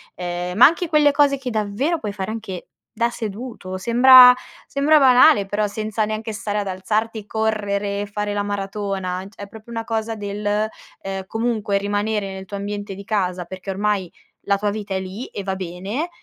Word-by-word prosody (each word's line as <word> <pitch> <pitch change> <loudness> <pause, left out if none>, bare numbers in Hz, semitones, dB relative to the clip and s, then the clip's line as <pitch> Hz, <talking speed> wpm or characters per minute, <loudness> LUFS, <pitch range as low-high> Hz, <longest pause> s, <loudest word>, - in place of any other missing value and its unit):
ehm, 180 0 -4
ma 240 - +9
anche 335 +3 +3
quelle 300 -2 +4
cose 280 -1 +3
che 260 -2 -5
davvero 220 +10 -1
puoi 210 -2 -4
fare 195 +1 -4
anche 215 -5 -6 0.3
da 235 +1 +1
seduto, 220 -4 -6
sembra 250 +4 +8 0.3
sembra 295 +2 +3
banale 255 -3 +6
però 205 +2 -1
senza 215 +1 -2
neanche 215 +1 -4
stare 210 0 -3
ad 200 - -3
alzarti, 215 +3 -2
correre, 205 -2 -1
fare 205 0 -3
la 205 0 -1
maratona, 195 -2 -3
cioè 205 -1 -11
è - - -8
proprio 220 +3 -13
una 225 -1 -4
cosa 225 -1 -2
del, 205 0 -6 0.6
ehm, 195 0 -4
comunque 225 -3 -1
rimanere 205 0 -1
nel 190 0 -7
tuo 200 +2 -6
ambiente 205 0 -5
di 200 +1 -10
casa, 185 -5 -1
perché 185 +2 -9
ormai 195 -2 -1 0.3
la 200 0 +1
tua 205 +1 -1
vita 205 -2 -5
è 190 - 0
lì 190 +6 -6
e 200 - -7
va 190 -1 -2
bene, 190 - -4
205 Hz, 180 wpm, -21 LUFS, 195-225 Hz, 0.6 s, ma